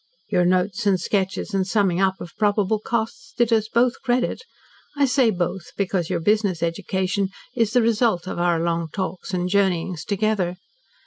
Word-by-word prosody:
Your 180 - +2
notes 185 +4 +1
and 190 -2 +3
sketches 195 +2 -1
and 190 -1 +1
summing 195 -3 +1
up 190 -1 +1
of 170 - -9
probable 210 0 +2
costs 225 +1 -3
did 240 -1 +3
us 220 -1 +2
both 240 +2 +1
credit 250 0 0 0.6
I 285 - +4
say 260 -2 +3
'both' 180 -2 -3
because 185 -4 -1
your 180 -2 0
business 205 -3 +1
education 190 +3 -1 0.3
is 230 -3 +1
the 245 -2 +4
result 225 -5 +2
of 175 - -4
our 175 -1 +2
long 170 0 -1
talks 185 0 -4
and 180 -1 -1
journeyings 180 -3 0
together. 200 -3 0
195 Hz, 170 wpm, -23 LUFS, 180-220 Hz, 0.6 s, I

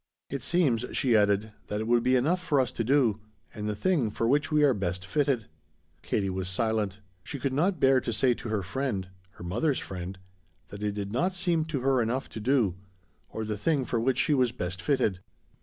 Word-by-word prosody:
"It 140 -1 -3
seems," 140 -10 +2
she 125 -4 +2
added, 105 0 +2 0.2
"that 105 - -2
it 110 - -2
would 120 +1 +3
be 130 +2 +3
enough 160 +9 +2
for 145 -6 +1
us 130 -2 +1
to 115 - -2
do. 120 -4 +3 0.3
And 105 0 -4
the 105 - -2
thing 145 - +1
for 115 +2 -1
which 145 +5 +2
we 150 -1 +4
are 140 -3 +5
best 95 -3 -3
fitted." 135 -1 0 0.6
Katie 100 - -1
was 95 0 -2
silent; 105 0 -1 0.2
she 140 - -6
could 135 0 -2
not 175 +5 +1
bear 135 -1 +5
to 120 - -3
say 125 +3 +3
to 115 -1 -7
her 105 -3 -1
friend 100 -1 -3 0.2
her - - -11
mother's 125 - 0
friend 90 0 -6 0.5
that 100 +1 -9
it 105 -1 -1
did 100 -1 -4
not 175 - +1
seem 170 -3 +1
to 150 -5 -3
her 130 -1 +3
enough 120 +4 -1
to - - -7
do, 110 -6 +2 0.5
or 110 - -4
the 105 -1 -3
thing 140 +1 +1
for 120 - -1
which 130 +3 +1
she 150 - +2
was 130 -4 +3
best 90 -5 -4
fitted. 125 -10 +1
120 Hz, 215 wpm, -28 LUFS, 105-140 Hz, 0.6 s, are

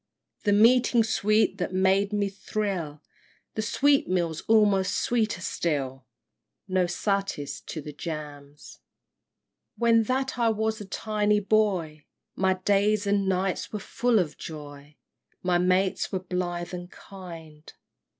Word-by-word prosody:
The 205 - +3
meeting 235 +2 +5
sweet 215 -1 +1
that 180 +1 -2
made 190 +2 +3
me 205 -1 0
thrill, 190 -6 -4 0.5
The 220 - -2
sweetmeats, 185 - +1
almost 205 -3 +3
sweeter 220 -6 0
still, 135 -7 -2 0.6
No 185 -2 +1
'satis' 195 -4 -2
to 155 - -5
the 150 +1 -8
'jams'! 145 -2 -8
XVII. - - -46 1.0
When 230 -1 +4
that 260 +1 -1
I 230 -1 +3
was 220 0 -1
a - - -6
tiny 210 +1 0
boy 190 -8 0 0.3
My 190 0 +2
days 205 +2 +2
and 200 -1 +1
nights 190 0 -1
were 215 - -3
full 240 +3 0
of 160 -6 -1
joy, 145 -2 -9 0.5
My 180 -1 +2
mates 185 +1 +1
were 190 - 0
blithe 180 -1 -3
and 175 0 -6
kind! 165 -7 -11
190 Hz, 130 wpm, -26 LUFS, 170-215 Hz, 1.0 s, meeting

